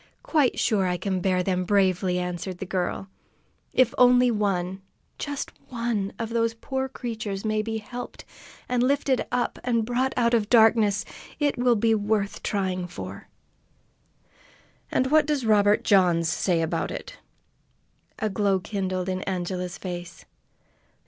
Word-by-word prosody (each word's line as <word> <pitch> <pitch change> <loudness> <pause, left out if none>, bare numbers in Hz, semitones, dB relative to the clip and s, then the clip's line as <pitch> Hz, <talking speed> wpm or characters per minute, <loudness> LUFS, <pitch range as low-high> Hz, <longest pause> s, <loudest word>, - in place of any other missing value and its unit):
"Quite 295 -6 +2
sure 200 -5 +2
I 180 0 0
can 190 -1 -2
bear 185 -1 +1
them 185 -1 0
bravely," 185 -1 +2
answered 180 +1 -4
the 190 - -5
girl. 185 +1 -2 0.6
"If 255 -2 +3
only 250 0 +6
one, 190 -3 -1 0.4
just 285 -1 -4 0.2
one, 230 -5 -2
of 225 -1 -3
those 230 0 0
poor 265 +3 -3
creatures 220 -6 -5
may 215 0 +1
be 220 +1 -3
helped, 245 +3 -8 0.4
and 250 -1 +1
lifted 270 0 +2
up, 245 -1 -1
and 230 -3 +1
brought 250 +3 0
out 235 -1 +2
of 220 -3 +2
darkness, 220 -3 +4 0.3
it 290 -2 +1
will 245 -1 +3
be 225 +1 +2
worth 205 -1 0
trying 185 -3 -1
for!" 175 - -8 1.6
"And 260 +1 0
what 310 -1 +5
does 290 -5 0
Robert 210 -1 +4
Johns 175 -4 +4
say 175 0 +1
about 160 - -1
it?" - - -7 1.0
A 220 - -1
glow 200 -1 +1
kindled 185 -2 -3
in 185 0 -2
Angela's 180 -1 -3
face. 175 -1 -7
210 Hz, 140 wpm, -25 LUFS, 185-240 Hz, 1.6 s, only